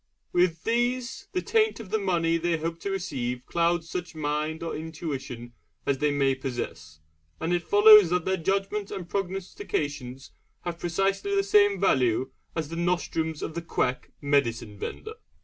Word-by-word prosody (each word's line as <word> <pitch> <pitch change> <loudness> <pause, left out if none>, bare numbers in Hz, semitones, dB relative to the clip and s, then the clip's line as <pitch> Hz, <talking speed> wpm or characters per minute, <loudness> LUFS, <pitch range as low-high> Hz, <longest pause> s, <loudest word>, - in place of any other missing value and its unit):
With 175 -2 +2
these, 245 - -1
the 365 -2 -1
taint 440 - +2
of 205 -4 -9
the 220 - +2
money 170 -4 +1
they 170 0 0
hope 165 +1 -3
to 200 - -4
receive 125 -10 -3
clouds 170 +1 +1
such 175 -1 -5
mind 155 +1 -2
or 165 - -3
intuition 145 -7 -6 0.3
as 135 -1 +1
they 150 0 +2
may 140 -2 +2
possess, 120 - -6 0.4
and 165 +2 -1
it 175 - +2
follows 205 +1 +8
that 180 -1 0
their 190 0 +1
judgments 195 +3 -1
and 180 -3 -5
prognostications 155 - -3 0.3
have 170 -1 -5
precisely 195 +3 0
the 195 - +3
same 205 0 +4
value 130 - +2 0.2
as 160 -3 -2
the 165 - -5
nostrums 165 -2 -1
of - - -4
the 170 - -3
quack 130 -6 -1
medicine 120 -7 0
vendor. 440 - -5
170 Hz, 160 wpm, -27 LUFS, 145-195 Hz, 0.4 s, follows